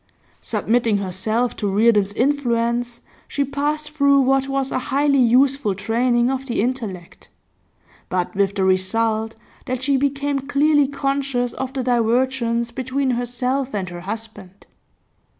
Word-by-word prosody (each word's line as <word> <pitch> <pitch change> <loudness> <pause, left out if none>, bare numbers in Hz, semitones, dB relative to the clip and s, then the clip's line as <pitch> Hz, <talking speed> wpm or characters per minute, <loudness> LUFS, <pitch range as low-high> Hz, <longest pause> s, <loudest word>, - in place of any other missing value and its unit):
Submitting 230 -2 +1
herself 200 +5 -1
to 205 - -1
Reardon's 205 -1 +3
influence, 240 -2 0 0.3
she 280 - -1
passed 300 +2 -2
through 280 -2 +4
what 270 +1 +2
was 270 -1 -1
a - - 0
highly 280 0 +2
useful 255 -2 +3
training 240 +4 +1
of 270 0 -4
the 240 - -2
intellect; 215 -7 -4 0.8
but 180 +1 -1
with 200 0 +1
the 195 - 0
result 220 +4 +1 0.3
that 255 0 -3
she 275 0 +2
became 280 +1 0
clearly 285 +1 +2
conscious 275 -3 -1
of 265 0 -5
the 265 -2 -2
divergence 235 0 +1
between 260 +2 -1
herself 250 +2 -2
and 190 -3 -3
her 175 0 -8
husband. 205 -1 -8
245 Hz, 135 wpm, -21 LUFS, 220-275 Hz, 0.8 s, through